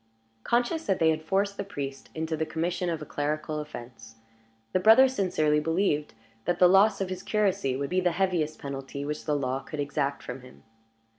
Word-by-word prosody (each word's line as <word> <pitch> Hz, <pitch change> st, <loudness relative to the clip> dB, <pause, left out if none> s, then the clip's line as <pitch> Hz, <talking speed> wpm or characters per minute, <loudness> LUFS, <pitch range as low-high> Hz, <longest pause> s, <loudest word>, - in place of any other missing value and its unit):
Conscious 245 Hz, +7 st, 0 dB
that 195 Hz, -, +2 dB
they 160 Hz, -1 st, +4 dB
had 155 Hz, 0 st, -2 dB
forced 200 Hz, +5 st, 0 dB
the 200 Hz, -, -2 dB
priest 140 Hz, -8 st, -6 dB
into 160 Hz, 0 st, -2 dB
the 160 Hz, -, -1 dB
commission 175 Hz, +3 st, -2 dB
of 160 Hz, -2 st, -3 dB
a -, -, -8 dB
clerical 150 Hz, +1 st, -2 dB
offense, 120 Hz, -6 st, -9 dB, 0.6 s
the 185 Hz, -, +3 dB
brothers 250 Hz, +7 st, +7 dB
sincerely 155 Hz, -8 st, +2 dB
believed 155 Hz, -, 0 dB, 0.3 s
that 175 Hz, 0 st, +1 dB
the 180 Hz, -, +7 dB
loss 195 Hz, +3 st, +5 dB
of 190 Hz, -, -1 dB
his 185 Hz, 0 st, -4 dB
curacy 195 Hz, -11 st, 0 dB
would 140 Hz, +3 st, -3 dB
be 185 Hz, 0 st, +2 dB
the 180 Hz, -2 st, +1 dB
heaviest 170 Hz, -4 st, 0 dB
penalty 140 Hz, 0 st, -6 dB
which 150 Hz, +1 st, -4 dB
the 150 Hz, -, +1 dB
law 130 Hz, -2 st, -1 dB
could 150 Hz, +2 st, -8 dB
exact 140 Hz, 0 st, -1 dB
from 135 Hz, -, -7 dB
him. 125 Hz, 0 st, -16 dB
160 Hz, 195 wpm, -27 LUFS, 145-185 Hz, 0.6 s, brothers